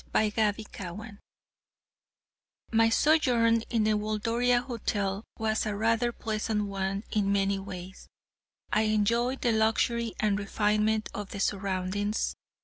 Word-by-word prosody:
CHAPTER 215 0 +2
XXIX 205 +2 -8 1.5
My 225 0 +4
sojourn 240 -4 +4
at - - -13
the 215 -2 +2
Waldoria 230 +4 +1
Hotel 205 -5 -2
was 220 0 0
a 210 - -2
rather 230 +3 +1
pleasant 215 -2 -2
one 195 0 -2
in 205 -2 +1
many 195 0 +1
ways. 190 -1 -9 0.7
I 215 - +4
enjoyed 235 +5 +1
the 240 - +2
luxury 225 +1 +1
and 205 -2 +1
refinement 210 +1 +1
of 205 -2 -5
the 200 - -6
surroundings. 200 +1 -1
215 Hz, 120 wpm, -28 LUFS, 200-225 Hz, 1.5 s, My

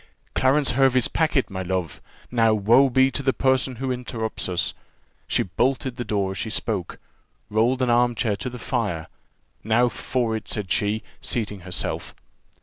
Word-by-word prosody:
"Clarence 135 +2 +3
Hervey's 130 -1 +4
packet, 155 -8 +1
my 95 -1 -4
love! 90 -5 -3 0.3
Now, 115 -2 +4
woe 120 +7 +5
be 130 +1 +4
to 135 - -1
the 135 -1 +1
person 130 -1 +1
who 130 +2 -3
interrupts 120 -5 -3
us!" 90 -1 0 0.5
She - - +2
bolted 130 +7 0
the 120 - -2
door 100 -4 -1
as 95 - -5
she 110 - -2
spoke. 105 -4 -2 0.5
rolled 120 +5 +2
an 125 - +2
arm 120 0 +3
chair 110 -2 0
to 125 - -4
the 125 - -8
fire 100 -10 -2 0.6
"Now 115 +3 +3
for 120 -1 -1
it!" 110 - -6
said 100 -4 -3
she, 105 +1 +1 0.2
seating 105 -4 -3
herself. 90 0 -4
120 Hz, 165 wpm, -24 LUFS, 105-130 Hz, 0.6 s, woe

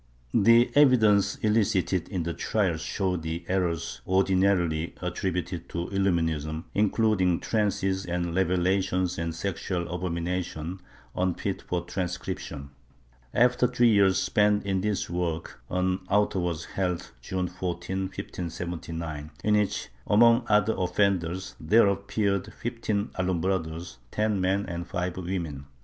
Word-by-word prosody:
The 115 +3 +5
evidence 110 -8 +5
elicited 100 -5 +1
in 90 -5 -2
the 85 +1 -2
trials 90 -6 0
showed 90 -1 -1
the 80 +2 -4
errors 85 -8 -1
ordinarily 95 -4 +2
attributed 90 -1 -3
to 85 0 -3
Illuminism, 80 -5 0
including 105 -4 +2
trances 95 -3 0
and 85 -1 -2
revelations 95 0 +1
and 85 -1 -2
sexual 90 -1 -3
abominations 90 0 -3 0.3
unfit 95 +1 -1
for 90 -1 -3
transcription. 85 -6 -4 0.6
After 125 - +4
three 120 -1 +3
years 100 -3 +4
spent 105 +1 +2
in 95 -1 0
this 105 0 -1
work, 85 -5 -3
an 90 +1 0
auto 105 -1 +2
was 85 -2 -2
held, 90 -2 -2
June 90 +7 -2
14, 90 +1 -3
1579, 85 -4 -5
in 105 0 +3
which, 105 -1 0 0.2
among 115 +3 +5
other 105 +1 +4
offenders, 95 -1 0
there 115 +1 +5
appeared 100 0 0
fifteen 110 -3 -2
Alumbrados 90 -4 -1
— 60 - -33
ten 105 - 0
men 95 +2 +1
and 85 0 -5
five 90 0 -2
women. 85 -7 -4
95 Hz, 120 wpm, -27 LUFS, 85-100 Hz, 0.6 s, The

